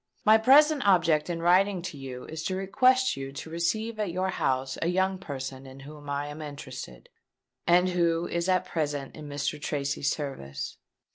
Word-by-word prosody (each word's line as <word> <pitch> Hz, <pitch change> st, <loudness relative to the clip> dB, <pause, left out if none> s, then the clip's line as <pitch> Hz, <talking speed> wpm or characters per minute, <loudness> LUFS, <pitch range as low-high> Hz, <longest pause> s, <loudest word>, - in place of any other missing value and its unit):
My 215 Hz, +1 st, +7 dB
present 285 Hz, +5 st, +6 dB
object 165 Hz, -5 st, +3 dB
in 165 Hz, -1 st, -3 dB
writing 185 Hz, +1 st, +3 dB
to 175 Hz, -, -5 dB
you 130 Hz, -2 st, -8 dB
is 160 Hz, 0 st, -6 dB
to 185 Hz, -, -1 dB
request 255 Hz, +7 st, +3 dB
you 135 Hz, 0 st, -6 dB
to 160 Hz, +3 st, -8 dB
receive 215 Hz, +7 st, -1 dB
at 210 Hz, -3 st, 0 dB
your 185 Hz, +2 st, -1 dB
house 130 Hz, -7 st, -1 dB
a 165 Hz, -, +1 dB
young 190 Hz, +1 st, +1 dB
person 135 Hz, -5 st, -6 dB
in 135 Hz, +1 st, -12 dB
whom 145 Hz, +1 st, -11 dB
I 140 Hz, 0 st, -2 dB
am 150 Hz, +2 st, -8 dB
interested, 140 Hz, -, -8 dB, 0.6 s
and 180 Hz, +2 st, +5 dB
who 170 Hz, -1 st, +1 dB
is 170 Hz, +2 st, -2 dB
at 185 Hz, 0 st, +2 dB
present 145 Hz, -5 st, -3 dB
in 150 Hz, -2 st, -9 dB
Mr. 145 Hz, +1 st, -3 dB
Tracy's 140 Hz, -2 st, -1 dB
service. 100 Hz, -, -5 dB
165 Hz, 180 wpm, -28 LUFS, 140-190 Hz, 0.6 s, My